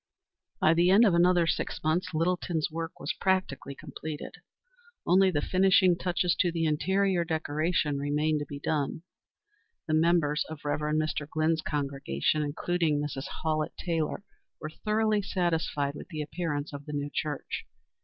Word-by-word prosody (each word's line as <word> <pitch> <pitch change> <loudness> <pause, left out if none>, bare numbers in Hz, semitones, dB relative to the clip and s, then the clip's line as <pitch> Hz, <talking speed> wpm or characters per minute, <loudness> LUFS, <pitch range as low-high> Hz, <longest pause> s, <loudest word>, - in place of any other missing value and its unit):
By 155 - +5
the 170 +2 +4
end 205 +5 +7
of 200 - +4
another 175 0 +4
six 165 - -2
months 170 +5 +1
Littleton's 165 -1 0
work 165 +1 -5
was - - -2
practically 185 -8 0
completed. 155 +2 -7 0.7
Only 190 +1 +5
the 145 -5 -1
finishing 185 -1 +4
touches 175 0 0
to 175 -3 +3
the 165 -1 -1
interior 185 +4 +1
decoration 155 -2 0
remained 150 +2 +1
to 145 - -5
be 145 - -6
done. 150 +2 -2 0.8
The 155 - 0
members 160 -2 +3
of 155 -2 -9
Rev. 145 0 0 0.2
Mr. 155 -1 -1
Glynn's 155 +1 +1
congregation, 140 - -1
including 155 +1 0
Mrs. 145 -2 -4 0.2
Hallett 155 -1 -1
Taylor, 165 +1 -2 0.4
were 155 - -6
thoroughly 215 +3 +1
satisfied 165 -7 -1
with 145 - -9
the 155 -3 -4
appearance 150 -2 -3
of 145 0 -7
the 150 - -5
new 145 0 -3
church. 150 -2 -3
160 Hz, 150 wpm, -29 LUFS, 150-175 Hz, 0.8 s, end